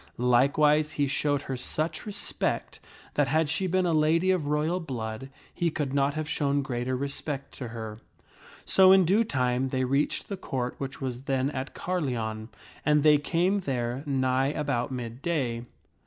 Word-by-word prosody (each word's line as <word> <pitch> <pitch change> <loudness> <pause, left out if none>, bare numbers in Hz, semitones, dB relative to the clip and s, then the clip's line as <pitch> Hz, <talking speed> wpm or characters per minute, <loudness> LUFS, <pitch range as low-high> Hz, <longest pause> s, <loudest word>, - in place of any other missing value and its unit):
Likewise 145 +5 +3
he 145 - +1
showed 145 +1 0
her 135 - -4
such 155 - -3
respect 205 - -2 0.3
that 145 -2 +2
had 155 +3 +2
she 185 +5 0
been 185 +1 +1
a 170 - +1
lady 160 +4 +3
of 175 -6 0
royal 150 +4 +1
blood, 125 -5 -5 0.2
he 175 - 0
could 145 -4 -3
not 140 +1 +1
have 155 -1 -3
shown 140 -2 0
greater 130 -1 -2
respect 140 0 -4
to 125 - -6
her. 110 -2 -7 0.7
So 190 -1 +6
in 190 -1 +6
due 200 +7 +4
time 130 - 0
they 130 0 -1
reached 140 +3 0
the 200 - -4
Court, 130 -8 -3
which 135 0 -5
was 130 0 -4
then 135 0 0
at 135 -1 -5
Carleon. 120 -11 -2 0.3
And 150 -1 +3
they 150 -1 +6
came 175 +7 +1
there 125 -6 -2
nigh 130 -1 +1
about 140 -4 -1
mid 120 -1 -5
day. 130 -8 -1
140 Hz, 170 wpm, -27 LUFS, 130-155 Hz, 0.7 s, So